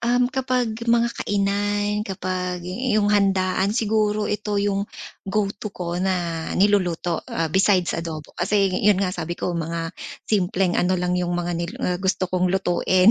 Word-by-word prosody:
um, 245 +1 +2
kapag 255 -3 0
mga 235 0 +3
kainan, 205 +1 0
kapag 180 -2 -3
'yong 210 +1 +1
handaan, 195 0 +2
siguro 215 -2 +1
ito 210 0 -2
'yong 200 0 0 0.4
go-to 205 +1 -1
ko 175 -1 -3
na 175 -3 -1
niluluto, 180 -4 +2
ah, 165 -1 -1
besides 190 -2 +3
adobo. 160 -2 -5
Kasi 195 +1 +1
'yon 205 -2 +5
nga 185 -1 0
sabi 175 -1 -4
ko, 180 - -2
mga 165 0 -3 0.3
simpleng 190 -3 +1
ano 185 +1 +2
lang 180 0 0
'yong 175 0 -1
mga 175 0 -1
nil 170 0 -3
ah, 180 -1 0
gusto 190 -1 +1
kong 180 0 +2
lutuin, 185 +1 +3
190 Hz, 150 wpm, -23 LUFS, 180-205 Hz, 0.4 s, yon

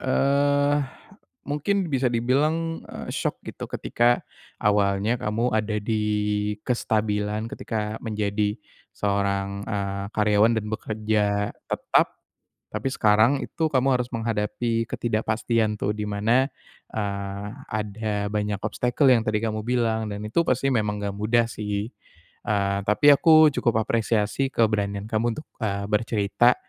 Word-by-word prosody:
eee, 140 +2 +2 0.7
mungkin 150 +7 -1 0.2
bisa 130 -1 +2
dibilang, 130 +7 +2 0.3
eee, - - -8
syok - - -1 0.2
gitu - - -7
ketika 120 +1 +1 0.4
awalnya 105 +3 +2
kamu 115 +1 0
ada 110 0 0
di 110 +1 -1 0.6
kestabilan 105 -2 -1
ketika 110 0 -4
menjadi 105 -1 -1 0.4
seorang, 100 -1 0 0.2
eee, 100 -1 -2
karyawan 105 +1 +4
dan 110 - -1
bekerja 105 -2 0 0.2
tetap, - - +1 0.6
tapi - - -4
sekarang 110 +3 +4
itu 160 - -2
kamu 130 0 +2
harus 125 - -1
menghadapi 115 +1 -1
ketidakpastian 110 0 0
tuh 100 - 0
di 105 -1 -3
mana, 110 +6 +2 0.5
eee, 100 -1 -3 0.3
ada 105 -1 -2
banyak 105 -1 -1
obstacle 125 +6 +1
yang 120 -3 +5
tadi 110 0 +1
kamu 110 -1 -2
bilang 115 -3 +1
dan 100 0 -5
itu 110 +11 +1
pasti 130 +2 +1
memang 105 -3 0
enggak 100 - -1
mudah 115 +3 +2
sih, 105 0 -3 0.6
eee, 100 -3 +1
tapi 105 +8 +5
aku 155 +1 +6
cukup 110 -2 +1
apresiasi 115 +3 0
keberanian 105 -2 +1
kamu 115 +1 +1
untuk, 155 - -8 0.2
eee, 100 -2 -1
bercerita 110 +2 +3
110 Hz, 125 wpm, -25 LUFS, 105-120 Hz, 0.7 s, aku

